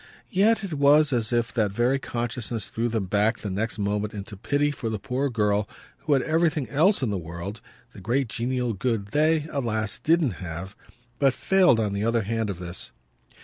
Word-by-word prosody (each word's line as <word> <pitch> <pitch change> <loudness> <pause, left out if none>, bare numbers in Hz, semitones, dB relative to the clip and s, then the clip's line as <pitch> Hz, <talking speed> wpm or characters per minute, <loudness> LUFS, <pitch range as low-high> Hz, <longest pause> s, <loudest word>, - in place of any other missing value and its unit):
Yet 215 +3 +3
it 190 -5 -4
was 145 0 +5
as 115 -2 0
if 120 -1 0
that 110 -4 +1
very 120 +6 +1
consciousness 120 -3 -3
threw 115 +1 -1
them 110 -3 -1
back 105 +4 +1
the 100 - -5
next 110 +5 -2
moment 105 +1 -1
into 100 +1 -7
pity 145 +8 0
for 120 -5 -4
the 110 - -2
poor 135 +4 -2
girl 105 -3 +1 0.3
who 150 - 0
had 135 - +3
everything 155 -4 +1
else 160 +3 +3
in 115 - 0
the 100 - -1
world, 85 +5 -7 0.3
the - - -11
great 125 +6 0
genial 125 +1 -1
good 105 -1 -2
they, 155 +4 +2
alas, 110 -7 -2
didn't 160 -5 +2
have, 90 +3 -6 0.4
but 135 -2 +3
failed 185 -11 +4
on 105 -3 0
the 100 +1 -1
other 115 0 +1
hand 110 +1 -1
of 95 - -4
this. 85 0 -6
115 Hz, 190 wpm, -25 LUFS, 105-140 Hz, 0.4 s, was